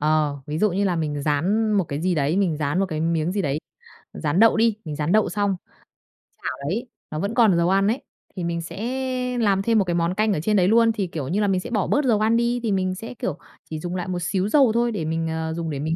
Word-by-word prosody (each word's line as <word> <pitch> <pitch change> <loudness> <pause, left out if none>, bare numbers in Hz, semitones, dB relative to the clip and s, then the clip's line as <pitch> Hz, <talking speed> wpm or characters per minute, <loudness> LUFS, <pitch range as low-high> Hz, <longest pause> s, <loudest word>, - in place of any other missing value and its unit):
Ờ, 150 -1 +1
ví 150 +1 -3
dụ 210 +2 +3
như 195 +3 0
là 180 -3 +1
mình 150 -3 -2
rán 190 +10 +1
một 200 -3 +2
cái 145 -1 -4
gì 180 +1 +1
đấy, 150 +3 +1
mình 185 -6 +1
rán 150 +2 -1
một 195 - +1
cái 155 -3 -4
miếng 165 +1 0
gì 200 0 -1
đấy, 145 -2 -1 0.6
rán 145 - -1
đậu 225 0 +6
đi, 225 -1 +3
mình 150 -2 -4
rán 150 +2 -1
đậu 215 +1 +3
xong. 200 +1 0 0.9
Chảo - - -3
đấy, 230 +8 -2 0.2
nó 155 - -3
vẫn 200 +6 -2
còn 225 -7 +4
dầu 170 +1 +2
ăn 195 +1 +3
ấy, 230 +5 0 0.3
thì 180 - -4
mình 170 0 -2
sẽ 250 +6 -3
làm 200 -4 +2
thêm 225 +3 +2
một - - +3
cái 175 - -1
món 170 +1 +1
canh 215 +2 +1
ở 180 - -1
trên 210 +6 +1
đấy 180 -1 +4
luôn, 230 +2 +5
thì, 205 -4 -2
kiểu 155 -6 -5
như 195 +8 0
là, 205 - +2
mình 190 -2 +2
sẽ - - -7
bỏ 210 -6 0
bớt 290 - +1
dầu 225 -5 +3
ăn 220 +2 +3
đi 240 +1 +1
thì 225 - 0
mình 185 -1 0
sẽ, 225 +6 -7
kiểu, 210 - -4 0.3
chỉ 155 - -4
dùng 175 +3 -4
lại 180 -1 -3
một 180 -1 -2
xíu 190 +3 0
dầu 270 -2 +5
thôi 235 +1 +1
để 190 -8 -3
mình, 165 +1 -1
ờ, 160 0 -2
dùng 165 0 -3
để 145 -3 -3
mình 160 +3 -1
185 Hz, 280 wpm, -23 LUFS, 160-215 Hz, 0.9 s, đậu